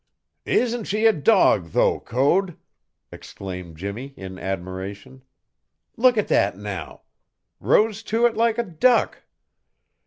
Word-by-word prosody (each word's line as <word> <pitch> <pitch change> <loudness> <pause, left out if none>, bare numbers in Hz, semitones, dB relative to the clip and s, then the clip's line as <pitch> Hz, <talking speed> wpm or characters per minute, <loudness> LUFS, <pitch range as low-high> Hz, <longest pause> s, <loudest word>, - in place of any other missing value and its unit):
"Isn't 240 -2 0
she 215 +3 -1
a 225 - +6
dog, 145 - +3
though, - - +2
Code?" 160 +9 0 0.5
exclaimed 90 -4 -9
Jimmie 110 - -7
in 95 -1 -9
admiration. 95 +7 -6 0.7
"Look 245 0 +4
at 210 - +1
that 95 -1 +1
now! 100 -6 -7 0.6
Rose 215 0 +2
to 230 +2 +2
it 235 - +2
like 230 0 +1
a 235 - +1
duck. 230 +6 +1
135 Hz, 120 wpm, -23 LUFS, -, 0.7 s, a